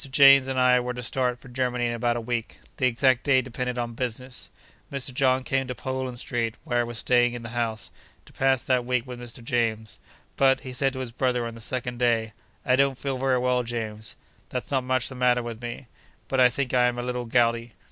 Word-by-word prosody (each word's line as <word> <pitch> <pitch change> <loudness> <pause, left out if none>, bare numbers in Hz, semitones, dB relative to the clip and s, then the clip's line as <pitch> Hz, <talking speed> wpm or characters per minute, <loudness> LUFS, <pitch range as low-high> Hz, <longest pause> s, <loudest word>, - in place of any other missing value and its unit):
James 135 0 +7
and 130 -1 -1
I 125 0 +5
were 125 0 -3
to 125 - -5
start 125 0 0
for 125 - -15
Germany 125 -1 -1
in 120 - 0
about 120 0 0
a - - -3
week. 115 -1 -3 0.2
The 130 - +3
exact 125 +1 +2
day 140 -2 +4
depended 125 0 -4
on 120 -1 -2
business. 125 +1 -4 0.4
Mr. 135 -2 -2
John 130 0 +2
came 135 +1 0
to 125 - -4
Poland 130 -1 -4
Street 120 -3 -2
(where 120 -1 0
I - - +3
was 120 -1 -5
staying 120 0 +3
in 120 - -7
the 115 - -6
house), 115 -2 -2 0.3
to - - -18
pass 135 -1 +2
that 125 -2 +2
week 125 0 0
with 125 -2 -8
Mr. 120 0 -8
James. 115 -2 -1 0.4
But, 135 -1 +4
he 130 -2 -7
said 135 +1 +1
to 130 - -4
his 125 -2 -5
brother 125 0 0
on 115 - -5
the 115 - -11
second 125 +1 -2
day, 115 -3 +1 0.3
'I 125 - +4
don't 135 -1 +3
feel 135 -1 -3
very 130 -1 +2
well, 125 0 +2
James. 110 -2 -4 0.3
There's - - -4
not 135 -2 +1
much 130 -1 +1
the - - -8
matter 125 -1 +2
with 115 -1 -6
me; 120 +2 -6 0.4
but 135 - 0
I 125 -1 +7
think 130 +1 -3
I 125 -1 +5
am 120 0 -1
a 120 - -2
little 125 0 -3
gouty. 115 -1 +1
125 Hz, 230 wpm, -26 LUFS, 120-130 Hz, 0.4 s, James